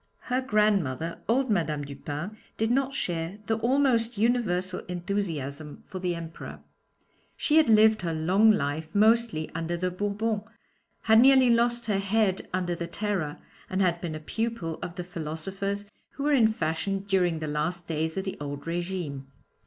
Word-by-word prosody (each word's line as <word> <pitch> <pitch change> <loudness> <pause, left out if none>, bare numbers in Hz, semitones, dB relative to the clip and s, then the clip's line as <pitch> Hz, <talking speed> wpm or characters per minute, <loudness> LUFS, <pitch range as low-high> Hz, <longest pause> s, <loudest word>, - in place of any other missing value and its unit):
Her 255 - +2
grandmother, 200 - +1
old 255 +1 +2
Madame 155 -6 0
Dupin, 145 +7 -6 0.2
did 225 +1 +1
not 270 +1 +1
share 170 -1 -2
the 225 +1 0
almost 240 -2 +2
universal 190 -6 +1
enthusiasm 165 -6 -4
for 185 - -7
the 180 -1 -1
Emperor 165 -1 -8 0.8
she 305 - +2
had 315 -6 +5
lived 220 -1 +6
her 170 -2 -2
long 180 +7 +3
life 155 -6 +1
mostly 220 -6 +3
under 165 +1 -2
the 180 +1 -1
Bourbons, 205 +3 -1 0.6
had 220 0 +5
nearly 260 -1 +6
lost 235 0 +3
her 205 -3 +1
head 200 -1 0
under 180 -1 -1
the 170 0 -4
Terror, 180 -5 -2 0.3
and 190 - -1
had 175 -3 +2
been 165 -3 -4
a - - -5
pupil 220 -2 -3
of 175 - -6
the 180 - -4
philosophers 185 +5 -3 0.3
who 280 - -5
were 295 0 +2
in 235 -5 +6
fashion 195 0 -1
during 180 -4 +2
the 155 - -4
last 155 +4 -2
days 160 +1 -2
of 190 - -2
the 190 - -4
old 145 -1 -5
régime. 170 -5 -3
190 Hz, 160 wpm, -27 LUFS, 165-220 Hz, 0.8 s, lived